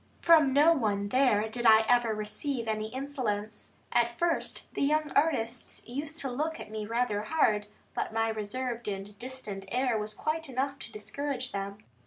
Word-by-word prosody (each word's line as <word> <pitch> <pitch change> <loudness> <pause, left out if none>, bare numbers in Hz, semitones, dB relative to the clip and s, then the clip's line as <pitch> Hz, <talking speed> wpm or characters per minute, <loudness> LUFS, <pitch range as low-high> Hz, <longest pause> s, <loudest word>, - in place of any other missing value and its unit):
From 315 -5 +6
no 295 +5 +6
one 205 -8 0
there 245 -4 +3
did 240 +2 0
I 220 0 +8
ever 240 -2 +4
receive 230 +4 -2
any 215 0 -1
insolence. 225 -5 -3 0.2
At 235 0 +2
first, 340 -1 -1
the - - -3
young 305 +2 +2
artists 250 -6 0
used 285 +6 -4
to 270 - -2
look 310 +6 -2
at 215 - -9
me 215 -1 -4
rather 230 -2 0
hard, 215 -6 +2 0.3
but - - -2
my 225 0 +1
reserved 230 +2 -3
and 200 0 -4
distant 235 -7 -5
air 250 -2 +1
was 210 0 -4
quite 320 -1 -2
enough 270 +2 -2
to 230 - -8
discourage 260 +4 -4
them. 200 +1 -5
240 Hz, 170 wpm, -30 LUFS, 215-275 Hz, 0.3 s, I